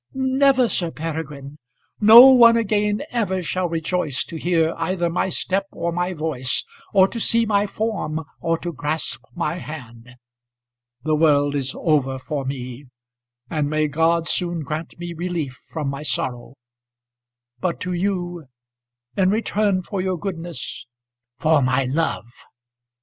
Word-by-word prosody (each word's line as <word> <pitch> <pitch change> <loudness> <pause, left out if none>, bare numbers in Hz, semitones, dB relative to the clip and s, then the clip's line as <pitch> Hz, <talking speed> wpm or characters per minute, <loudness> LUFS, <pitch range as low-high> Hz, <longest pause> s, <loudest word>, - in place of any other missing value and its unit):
"Never, 265 -1 +3
Sir 175 -6 0
Peregrine. 150 -3 -6 0.4
No 225 +4 +10
one 235 -2 +7
again 210 -1 0
ever 190 -6 -1
shall 180 +2 -1
rejoice 165 -3 -1
to - - -10
hear 165 0 +1
either 170 0 -1
my 180 - 0
step 195 +2 -1
or 170 0 -3
my 175 +2 -1
voice, 150 -6 -2 0.3
or 190 -2 +5
to 235 - -5
see 230 +1 +3
my 205 -1 +1
form, 200 -8 -2 0.2
or 165 0 0
to 175 -1 -4
grasp 145 -3 -3
my 170 0 -2
hand. 125 -6 -10 0.9
The 155 +1 +1
world 145 -2 +3
is 135 -2 -2
over 140 -5 +1
for 140 +1 -4
me, 130 0 -6 0.6
and 150 0 -1
may 155 0 +1
God 165 +3 +1
soon 170 0 0
grant 155 +2 -5
me 175 0 -6
relief 170 -5 -3 0.2
from 155 -3 -4
my 140 +1 -5
sorrow. 130 -6 -3 1.0
But 170 +5 -2
to 180 0 -2
you 175 -4 -2 0.7
in 190 -1 +3
return 205 -2 +1
for 195 0 -3
your 185 -1 -1
goodness 170 -8 -6 0.2
" 120 +1 -65
"For 155 -2 +4
my 130 +1 +2
love." 140 0 -1
165 Hz, 145 wpm, -22 LUFS, 145-185 Hz, 1.0 s, No